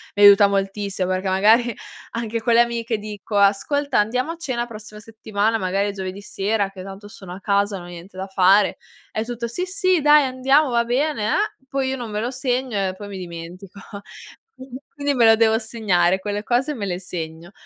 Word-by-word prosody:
mi 205 - +3
aiuta 200 0 +8
moltissimo 195 -1 -2
perché 185 +1 -1
magari 220 +5 +4 0.4
anche 230 -1 -3
con 235 +1 +1
le - - +6
amiche 235 -1 +1
dico: 210 0 -5
"Ascolta 250 +8 +2
andiamo 250 +8 0
a - - -6
cena 255 -8 -3
prossima 215 -2 -11
settimana, 220 0 -2
magari 200 +1 -1
giovedì 190 0 -6
sera 200 0 -1
che 190 -1 -10
tanto 195 +2 -10
sono 200 -4 -12
a 185 - -9
casa, 200 0 0
non 175 - -9
ho - - -11
niente 175 +2 -11
da 190 +1 -5
fare." 190 +1 +4 0.4
E 220 - -1
tutto: 235 0 -4
"Sì, 235 +10 -4
sì 370 -2 +1
,dai 295 0 +6
andiamo 270 +3 +2
va 235 -1 +2
bene, 250 0 0
eh" 420 - -1
poi 270 0 -1
io 265 - -1
non 240 -4 -6
me 210 - -2
lo 235 +3 -2
segno 255 -3 -2
e 185 - -6
poi 205 - -8
mi 200 -1 -7
dimentico. 180 +2 -9 1.1
Quindi 285 0 -1
me 245 -3 +2
lo 225 0 +7
devo 220 0 +4
segnare, 190 -6 +1
quelle 205 +1 -4
cose 255 +6 0
me 220 -7 -4
le 180 -2 -3
segno 170 -1 -7
210 Hz, 195 wpm, -21 LUFS, 195-240 Hz, 1.1 s, aiuta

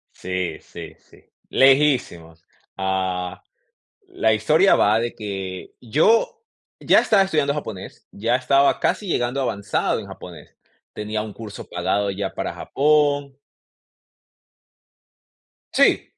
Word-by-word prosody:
Sí, 90 -3 -4
sí, - - -10
sí, - - -22 0.3
lejísimos. 130 - +2 0.3
Ah, 95 -2 -2 0.6
la 110 0 +1
historia 155 - +4
va 105 +2 +3
de 120 0 -3
que 95 -3 -6
yo, 225 - +1 0.3
ya - - +4
estaba 200 -3 +3
estudiando 150 -7 0
japonés, 110 -10 -8
ya 115 +4 0
estaba 135 +2 +2
casi 205 - -1
llegando 125 -3 -1
avanzado 100 -7 -1
en - - -7
japonés, - - -12 0.4
tenía 105 0 -4
un 110 -1 -8
curso 110 -1 -9
pagado 100 0 -1
ya 95 0 -4
para - - -3
Japón 145 -1 +1 2.4
Sí. - - +4
110 Hz, 110 wpm, -22 LUFS, 95-140 Hz, 2.4 s, historia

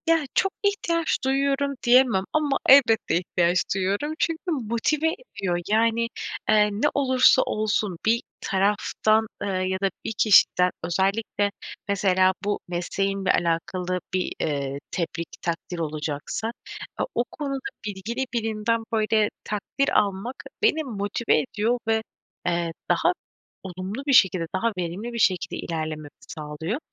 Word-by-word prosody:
Ya 330 -2 +3
çok 390 - +2
ihtiyaç 340 -5 +1
duyuyorum 275 +1 +1
diyemem 240 -5 +5
ama 295 -3 +2
elbette 235 -9 +6
ihtiyaç 175 0 +1 0.2
duyuyorum. 200 +11 -1
Çünkü 330 -1 -1
motive 270 +4 0
ediyor 200 - -3
yani, 230 +2 +2 0.4
eee, 210 -1 +5
ne 210 +8 +1
olursa 260 -1 +5
olsun 210 -5 -1
bir 230 +2 +3 0.2
taraftan, 210 +2 +1 0.2
ııı, 185 -2 -1
ya 190 0 -1
da 195 - +2 0.2
bir - - -2
kişiden 180 -3 +5
özellikle 195 +4 0 0.4
mesela 190 -2 +3
bu 205 0 -1
mesleğimle 195 +3 -1
alakalı 180 +2 -1
bir, 185 -1 -1
eee, 140 -2 -2
tebrik, 170 -1 -3
takdir 170 +1 -3
olacaksa 155 +7 -3 0.6
o 240 - +2
konuda 275 -2 -3 0.3
bilgili 215 +6 -3
birinden 225 0 0
böyle 215 -1 +2
takdir 210 +6 -1
almak 200 +5 -2 0.3
beni 320 -8 +3
motive 215 -2 0
ediyor 235 0 -1
ve, 225 0 +2 0.5
eee, 170 -1 0 0.2
daha - - +3 0.5
olumlu 190 +8 -6
bir 280 - +3
şekilde 185 -8 +5
daha 230 +5 +1
verimli 180 +7 -4
bir 235 - -4
şekilde 185 -4 +1
ilerlememi 155 -2 -4 0.2
sağlıyor. 155 - -4
210 Hz, 125 wpm, -25 LUFS, 180-240 Hz, 0.6 s, elbette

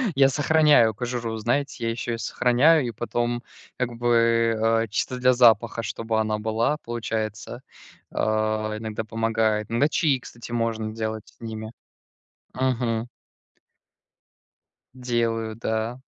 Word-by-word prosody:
Я 135 0 +5
сохраняю 145 -6 +4
кожуру, 120 0 -3
знаете, 120 +3 -1
я 115 - 0
ещё 120 +1 -3
её 115 - -2
сохраняю 130 +5 +3
и - - -3
потом, 120 +1 -2 0.4
как 125 -1 -1
бы, 120 0 +2 0.7
э, - - -13
чисто 125 +3 -2
для 125 0 +4
запаха, 115 -1 +4
чтобы 115 +1 -2
она 110 -1 -1
была, 110 +7 0
получается, 110 0 -4 0.5
э, - - -11 0.6
иногда 110 0 -4
помогает. 110 -1 0
Иногда 140 +6 +3
чаи, 140 -6 +2
кстати, 120 0 -11
можно 115 -2 -1
делать 110 -1 -4
с - - -22
ними. 110 -1 -6 0.8
Мгм. 120 -2 -1 1.9
Делаю, 115 -3 -1
да. 115 +2 -2
115 Hz, 125 wpm, -24 LUFS, 110-125 Hz, 1.9 s, Я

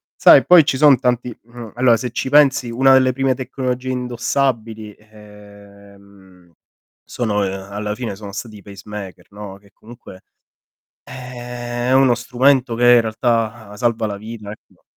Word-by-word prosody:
Sai - - +6
poi 175 -4 +6
ci 135 - -1
son 140 -3 +5
tanti, 125 -2 -2
mh, 120 -1 -12
allora 125 -1 +3
se 125 +2 -5
ci 125 - -4
pensi 140 -3 +3
una 135 +3 +3
delle 130 -1 +3
prime 135 0 0
tecnologie 130 0 -5
indossabili 120 -3 -3
ehm 100 -3 -18 0.6
sono 110 -4 -2
alla 100 +2 -5
fine 115 -5 -6
sono 100 0 -10
stati 105 +2 -8
i - - -15
pacemaker, 100 0 -10
no, 100 -1 -10
che 100 0 -24
comunque 110 -5 -15 0.8
eh 120 -1 -7
è - - +1
uno 130 -2 +4
strumento 125 +1 +1
che 120 - -2
in 120 - +5
realtà 110 -1 -2
salva 115 -2 -1
la 100 -1 -6
vita, 110 -1 -9
ecco. 105 - -17
115 Hz, 150 wpm, -18 LUFS, 105-125 Hz, 0.8 s, Sai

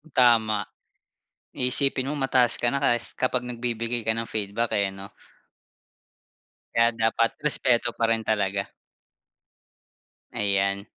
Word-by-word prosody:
Tama. 115 -4 +3 0.9
Iisipin 130 +1 +2
mo 150 - -3
mataas 130 -3 +3
ka 120 - 0
na 140 - -1
kas 120 -4 0
kapag 125 -1 -1
nagbibigay 120 -1 -3
ka 110 +1 0
ng 115 - -2
feedback 110 +2 -2
eh, 100 -1 +1
'no? 95 +1 -10 1.6
Kaya 115 0 +4
dapat 115 0 0
respeto 125 -5 +2
pa 115 0 +1
rin 115 - +1
talaga. 100 -3 -1 1.7
Ayan, 100 0 0
115 Hz, 115 wpm, -25 LUFS, 105-125 Hz, 1.7 s, Kaya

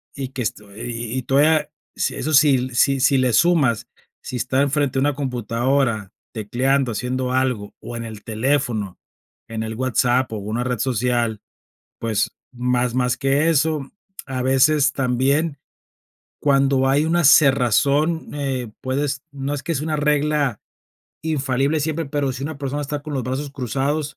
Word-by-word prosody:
y 135 -2 -4
que 130 - -4
esto 105 -3 -5
y 115 0 -5
y - - -4
todavía 150 +3 +3 0.2
sí, - - -1
eso 155 - -2
sí 135 -3 +4
si 135 +2 +3
si 135 +1 +4
le 130 -2 +2
sumas, 135 -10 +3 0.3
si 125 - -7
está 125 +3 0
en 140 - +2
frente 145 -3 +1
de - - +3
una 145 0 +1
computadora 120 -4 -1 0.2
tecleando, 125 +4 0
haciendo 125 +2 -2
algo, 130 -6 -1
o 120 - -8
en 115 - -4
el 110 -2 -8
teléfono, 115 -4 -1 0.5
en 110 -1 -4
el 110 0 -5
WhatsApp 125 0 +1
o - - -3
una 110 +4 -3
red 125 -3 -2
social, 120 -3 0 0.6
pues, 110 -3 0 0.2
más 125 0 0
más 125 -1 +1
que 140 +4 +2
eso, 155 -2 +1 0.3
a 130 -2 -3
veces, 135 +2 +3
también 135 +4 +1 0.8
cuando 135 -2 +3
hay 145 +3 +3
una 170 +1 +2
cerrazón, 140 +3 +4
eh, 130 -5 -3
puedes 135 0 -1
no 140 +1 -4
es 140 - -3
que 165 - -2
sea 145 - -2
una 155 -1 -1
regla 150 -4 +1 0.6
infalible 145 -1 0
siempre, 160 +1 -2
pero, 140 -2 -1
si 130 +2 -7
una 155 -1 -5
persona 140 +1 -3
está 145 0 -4
con 150 0 -7
los 130 - -1
brazos 135 +3 -3
cruzados, 140 +3 -2
135 Hz, 160 wpm, -21 LUFS, 120-145 Hz, 0.8 s, sí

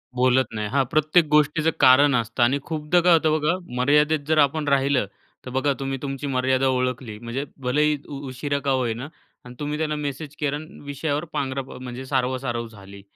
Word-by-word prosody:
बोलत 130 +1 +3
नाही. 105 -1 -3
हां, 140 +4 +2
प्रत्येक 155 +2 +3
गोष्टीचं 150 +1 +3
कारण 140 +1 +6
असतं 115 +1 0
आणि 130 +4 +3
खूपदा 155 +2 0
काय 175 0 +5
होतं 160 -1 +3
बघा, 155 +3 +1 0.2
मर्यादेत 150 +4 +3
जर 155 0 +2
आपण 150 +1 +2
राहिलं, 140 -4 +2 0.4
तर 125 - -6
बघा 135 +2 +1
तुम्ही 135 0 -3
तुमची 135 0 -4
मर्यादा 130 0 +1
ओळखली, 125 -3 -2
म्हणजे 120 +4 -4 0.2
भलेही 150 +4 +2
उ 140 - -7
उशिरा 140 +2 -2
का 140 - +2
होईना 125 -1 -1 0.4
आणि 125 0 -11
तुम्ही 150 0 -3
त्याला 155 -1 -1
मेसेज 145 0 -5
केला 145 -1 0
आणि 155 +4 -11
विषयावर 145 +2 -2
पांघरा 135 0 -2 0.2
म्हणजे 130 +1 -7
सारवासारव 125 -3 -1
झाली. 100 -2 -13
135 Hz, 180 wpm, -23 LUFS, 125-150 Hz, 0.4 s, कारण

